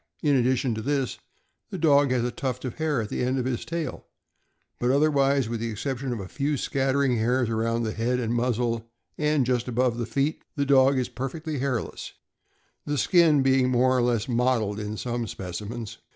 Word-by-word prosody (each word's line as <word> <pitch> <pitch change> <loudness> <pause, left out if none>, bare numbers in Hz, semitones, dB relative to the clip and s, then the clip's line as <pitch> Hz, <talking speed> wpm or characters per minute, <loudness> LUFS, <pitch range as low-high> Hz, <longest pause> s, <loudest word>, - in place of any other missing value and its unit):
In 145 -2 +3
addition 130 -1 +2
to 110 - -4
this, 135 -2 -1 0.5
the 190 - -5
dog 145 -4 +4
has 125 -2 +1
a 120 - -1
tuft 130 -5 -4
of 125 - -6
hair 150 -7 0
at 105 - -7
the - - -3
end 130 +2 0
of 125 - -1
his 130 -2 -2
tail, 165 -4 -5 0.7
but 120 - +1
otherwise, 140 -2 +3
with 115 0 -3
the 115 +1 -2
exception 130 +4 -3
of 120 - -3
a 95 - -6
few 145 +6 -1
scattering 135 -1 +1
hairs 120 +1 +1
around 115 +1 0
the 110 - -1
head 120 +3 0
and 115 -1 -1
muzzle 120 -1 -1 0.3
and 150 -3 +2
just 125 -1 0
above 125 -1 0
the 120 - -2
feet, 140 +6 -1
the 140 -2 0
dog 135 0 +5
is 125 - 0
perfectly 145 +4 -5
hairless, 130 -3 -3 0.7
the 145 0 -2
skin 160 -4 +4
being 130 -1 +3
more 130 +1 +3
or 125 - +3
less 120 -3 +1
mottled 120 -4 +1
in 105 0 -4
some 120 0 -3
specimens. 105 +5 -6
125 Hz, 195 wpm, -26 LUFS, 115-140 Hz, 0.7 s, dog